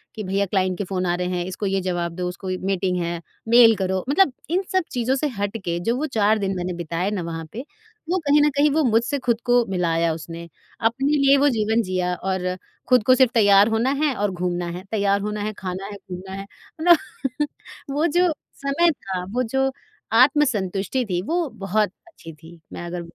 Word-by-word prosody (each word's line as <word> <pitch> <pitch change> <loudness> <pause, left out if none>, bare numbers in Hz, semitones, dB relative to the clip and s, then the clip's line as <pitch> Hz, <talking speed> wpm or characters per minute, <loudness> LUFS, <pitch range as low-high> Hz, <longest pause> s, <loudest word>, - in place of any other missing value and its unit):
कि 215 - -5
भैया 195 +1 0
क्लाइंट 185 -2 0
के 205 - -2
फ़ोन 185 -1 -2
आ 175 - +1
रहे 180 0 -2
हैं 175 - -2
इसको 185 +3 -5
ये 195 0 0
जवाब 175 -2 -2
दो 180 0 -2
उसको 185 +2 -8 0.2
मीटिंग 190 -1 0
है, 170 0 -3 0.3
मेल 230 -1 +7
करो, 190 -1 -1
मतलब 360 +2 +4 0.2
इन 365 +4 +1
सब 375 -1 +2
चीज़ों 250 0 0
से 300 +3 0
हट 205 +2 -2
के 170 0 -1
जो 230 +7 0
वो 300 - -1
4 215 0 +3
दिन 195 -2 -2
मैंने 180 0 -3
बिताए 170 +3 -2
ना 205 -3 -2
वहाँ 165 -1 -5
पे 245 +5 -7 0.4
वो 365 - +2
कहीं 290 +1 +5
न - - +4
कहीं 295 +1 +4
वो 310 +2 +2
मुझसे 240 +3 +1
ख़ुद 240 -2 0
को 245 -1 +4
मिलाया 170 -3 +1
उसने 165 +1 -8 0.3
अपने 235 +5 +1
लिए 275 0 +5
वो 285 +1 +4
जीवन 220 -2 +1
जिया 185 -2 -1
और 185 0 -2 0.3
ख़ुद 250 -3 +5
को 255 - +6
सिर्फ़ 255 -2 +4
तैयार 205 -3 +6
होना 225 +3 +1
है 295 -3 +2
और 205 -1 0
घूमना 175 -1 -2
है 185 - -9
तैयार 200 -2 +1
होना 210 +1 -3
है 215 +1 -3
खाना 185 +1 -5
है 205 - -7
घूमना 185 +1 -7
है - - -9 0.4
मतलब। 295 -4 +2 0.4
वो 300 +4 +1
जो 355 -1 +4 0.3
समय 335 +5 +3
था 190 - -5
वो 250 +1 +1
जो 265 +3 0 0.5
आत्मसंतुष्टि 250 -5 +1
थी 175 -1 0
वो 340 0 0
बहुत 205 -1 -1 0.2
अच्छी 165 - -12
थी। 165 +2 -15
मैं 175 - -6
अगर 175 0 -5
205 Hz, 205 wpm, -23 LUFS, 180-255 Hz, 0.5 s, मेल